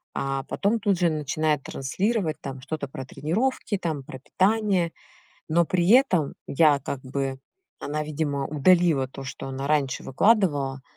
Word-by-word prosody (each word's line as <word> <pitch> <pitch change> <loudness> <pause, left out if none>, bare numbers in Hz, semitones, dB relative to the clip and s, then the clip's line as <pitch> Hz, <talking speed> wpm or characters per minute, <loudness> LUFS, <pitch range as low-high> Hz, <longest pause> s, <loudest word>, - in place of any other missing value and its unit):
А 135 0 -2
потом 215 +3 0
тут 195 -3 +1
же 175 -2 +3
начинает 150 -1 -1
транслировать 180 - -1
там 135 -2 -7
что-то 145 +1 -4
про 130 0 -7
тренировки, 200 - -1
там 155 -5 -3
про 130 - -9
питание, 190 - +1 0.6
но 170 +2 +3
при 175 +1 0
этом 210 - +4
я 145 -1 +4
как 140 0 -5
бы 135 0 -3 0.4
она, 150 +1 -2
видимо, 145 -2 -2
удалила 155 -2 +3
то, 135 +1 -9
что 130 - -7
она 135 +1 -4
раньше 145 -3 0
выкладывала. 145 - +2
150 Hz, 150 wpm, -25 LUFS, 135-180 Hz, 0.6 s, этом